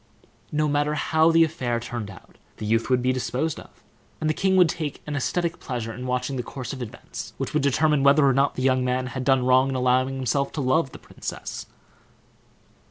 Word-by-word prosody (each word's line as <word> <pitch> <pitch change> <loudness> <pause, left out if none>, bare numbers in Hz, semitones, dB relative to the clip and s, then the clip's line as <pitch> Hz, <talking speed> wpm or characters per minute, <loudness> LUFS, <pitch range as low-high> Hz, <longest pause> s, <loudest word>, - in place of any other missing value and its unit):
No 150 0 +1
matter 145 +1 +1
how 160 +2 +3
the 165 0 +6
affair 130 -7 -1
turned 120 -3 -5
out, 95 - -15 0.2
the 110 - -5
youth 115 +3 +1
would 125 -1 +2
be 130 0 +2
disposed 130 +4 -2
of, - - -16 0.4
and 155 - -1
the 155 - +2
king 190 +3 +1
would 180 -2 +6
take 155 -4 -4
an 150 - -4
aesthetic 170 +4 -1
pleasure 120 -3 -4
in 125 +2 -6
watching 125 +2 -1
the - - -1
course 130 +2 -6
of 130 - -7
events, 120 - -8
which - - -4
would - - +2
determine 150 +1 +2
whether 140 +1 +5
or 135 - +4
not 135 +2 +2
the 130 - -3
young 130 -1 +3
man 125 0 0
had 130 0 -4
done 130 -1 +3
wrong 130 +1 +4
in 135 - -2
allowing 130 +1 +2
himself 135 +2 0
to - - -4
love 135 +2 +1
the - - -10
princess. - - -7
135 Hz, 215 wpm, -24 LUFS, 125-150 Hz, 0.4 s, the